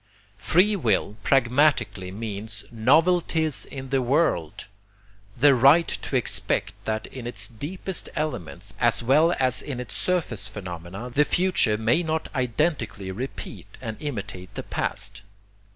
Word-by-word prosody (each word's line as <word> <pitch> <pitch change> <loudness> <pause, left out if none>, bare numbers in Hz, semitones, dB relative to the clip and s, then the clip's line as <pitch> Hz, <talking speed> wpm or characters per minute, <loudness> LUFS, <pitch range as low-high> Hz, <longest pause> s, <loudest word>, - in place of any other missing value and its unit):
Free 190 - +3
will 110 - +1
pragmatically 125 -7 +2
means 105 0 -4
NOVELTIES 160 +5 +2
IN 135 -1 -8
THE 135 0 +2
WORLD, 125 - +1 0.7
the 145 -1 +6
right 140 +7 +6
to - - -4
expect - - +1
that 110 0 -2
in 125 -3 -8
its 120 - -3
deepest 170 - -5
elements 150 - -4
as - - +2
well 155 +8 +4
as 130 -1 +1
in 140 -4 -5
its 125 - -7
surface 135 - -1
phenomena, 95 +2 -7
the 145 +4 +4
future 175 - +2
may 115 +10 +3
not 160 -1 -2
identically 125 - -1
repeat 100 -3 -7
and 110 -4 -5
imitate 100 -10 -5
the - - -4
past. 100 +1 -3
125 Hz, 130 wpm, -25 LUFS, 105-155 Hz, 0.7 s, the